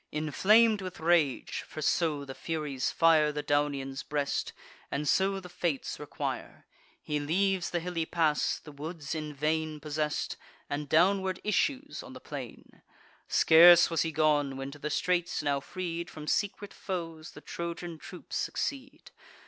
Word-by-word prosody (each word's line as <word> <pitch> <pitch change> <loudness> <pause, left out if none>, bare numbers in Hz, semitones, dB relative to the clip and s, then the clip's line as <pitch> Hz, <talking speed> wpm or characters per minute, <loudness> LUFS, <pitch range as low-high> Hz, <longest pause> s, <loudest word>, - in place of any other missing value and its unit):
Inflam'd 205 +8 +4
with 185 -2 -7
rage, 160 -5 +1
(for - - -8
so 150 -2 +1
the 135 - -7
Furies 150 -4 -2
fire 160 -2 +4
The 150 0 -4
Daunian's 140 -2 0
breast, 145 -1 -2 0.4
and 150 +1 -2
so 195 +6 +2
the 185 - -10
Fates 170 -5 -3
require,) 150 - -5 0.4
He 150 0 -1
leaves 185 +5 +1
the 175 - -1
hilly 165 -1 -3
pass, 160 -3 +1
the 150 - -12
woods 150 +1 -6
in 155 -1 -4
vain 155 +1 -1
Possess'd, 150 0 -2 0.3
and 145 0 -4
downward 190 +3 +3
issues 270 +7 0
on - - -11
the - - -9
plain. - - -9 0.5
Scarce 170 +1 +7
was 165 - +1
he 165 - 0
gone, 145 -3 +2
when 135 +1 -5
to 150 - -11
the 150 - -3
straits, 175 +1 0
now 140 -1 +1
freed 170 +2 -5
From 155 -1 -9
secret 205 +4 -1
foes, 165 -4 -5
the - - -11
Trojan 170 -1 -6
troops - - -7
succeed. 275 0 -4
160 Hz, 150 wpm, -30 LUFS, 150-180 Hz, 0.5 s, Scarce